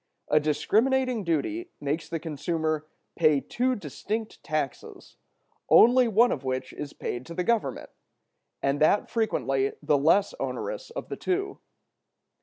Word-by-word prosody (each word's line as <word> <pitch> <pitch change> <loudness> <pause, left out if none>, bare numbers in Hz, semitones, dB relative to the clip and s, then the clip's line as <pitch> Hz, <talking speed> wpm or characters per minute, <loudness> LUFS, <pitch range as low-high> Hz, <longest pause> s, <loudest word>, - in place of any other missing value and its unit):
A 150 - +5
discriminating 230 - +1
duty 250 - -1
makes 150 +2 -3
the 165 - -2
consumer 155 0 -2 0.3
pay 155 -4 +4
two 255 - -1
distinct 215 +1 -5
taxes, 150 -4 -4 0.5
only 250 +1 +7
one 230 +3 +4
of 140 - -3
which 130 0 -3
is 145 -1 -6
paid 120 - -5
to 170 - -8
the 180 - 0
Government, 210 - -1 0.7
and 140 +1 +1
that 155 +7 +3
frequently 135 - 0
the 150 -1 +2
less 165 +8 +3
onerous - - -4
of - - -7
the - - -5
two. 390 +2 -2
165 Hz, 135 wpm, -27 LUFS, 145-235 Hz, 0.7 s, only